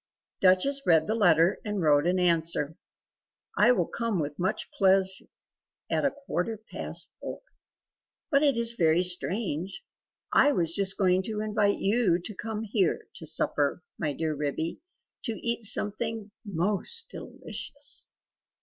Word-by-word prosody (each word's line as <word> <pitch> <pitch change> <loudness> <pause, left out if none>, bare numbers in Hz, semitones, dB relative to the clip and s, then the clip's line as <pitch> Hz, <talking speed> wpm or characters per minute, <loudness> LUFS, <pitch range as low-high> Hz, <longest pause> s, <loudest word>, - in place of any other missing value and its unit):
Duchess 190 +10 +3
read 160 -3 +4
the 215 - 0
letter 175 -4 +4
and 210 -2 -3
wrote 150 -2 +3
an 180 +1 +2
answer: 165 -3 +1 0.8
"I 240 - +5
will 250 - +2
come 230 -5 -2
with 145 -1 -4
much 190 +3 -2
pleasure 190 -1 +2 0.7
at - - +1
a - - +4
quarter 230 -7 -3
past - - -5
four. - - -7 0.9
But 280 -1 +4
it 280 -5 +3
is 235 0 +1
very 170 -4 +3
strange. 185 - -2 0.5
I 290 - +5
was 170 -7 0
just 195 0 0
going 185 -1 +3
to 215 -1 -3
invite 210 -1 +1
you 200 -4 +2
to 180 +5 -7
come 220 +2 -5
here, 205 -4 0
to 160 - -7
supper, 150 0 0 0.2
my 155 -3 0
dear 155 +2 -2
Ribby, 150 +3 -3 0.4
to 230 - -1
eat 235 +1 -1
something 215 +1 +1
MOST 205 - -1
DELICIOUS." 285 0 -5
195 Hz, 140 wpm, -28 LUFS, 170-225 Hz, 0.9 s, I